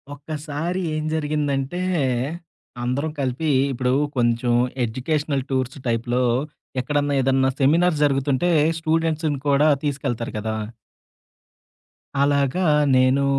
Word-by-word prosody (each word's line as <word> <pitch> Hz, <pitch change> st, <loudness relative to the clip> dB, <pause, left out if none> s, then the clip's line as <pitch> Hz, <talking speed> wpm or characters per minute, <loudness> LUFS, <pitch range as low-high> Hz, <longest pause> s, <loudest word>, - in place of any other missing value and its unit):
ఒక్కసారి 155 Hz, +4 st, -4 dB
ఏం 155 Hz, 0 st, -2 dB
జరిగిందంటే 150 Hz, +1 st, -1 dB, 1.0 s
అందరం 140 Hz, +6 st, -1 dB
కలిపి 135 Hz, +4 st, -1 dB, 0.2 s
ఇప్పుడు 125 Hz, 0 st, 0 dB, 0.2 s
కొంచెం 120 Hz, 0 st, +2 dB, 0.3 s
ఎడ్యుకేషనల్ 140 Hz, +3 st, -1 dB
టూర్స్ 130 Hz, -1 st, -1 dB
టైప్‌లో 120 Hz, +2 st, 0 dB, 0.6 s
ఎక్కడన్నా 145 Hz, +2 st, 0 dB
ఏదన్నా 135 Hz, 0 st, +2 dB
సెమినార్స్ 160 Hz, +3 st, +3 dB
జరుగుతుంటే 140 Hz, +4 st, +1 dB, 0.3 s
స్టూడెంట్స్‌ని 160 Hz, -2 st, 0 dB
కూడా 145 Hz, +2 st, +4 dB, 0.2 s
తీసుకెళ్తారు 135 Hz, -5 st, -2 dB
గదా! 110 Hz, +1 st, -3 dB, 1.7 s
అలాగా 140 Hz, +5 st, +1 dB, 0.3 s
నేను 130 Hz, +2 st, +3 dB
140 Hz, 90 wpm, -22 LUFS, 130-155 Hz, 1.7 s, కూడా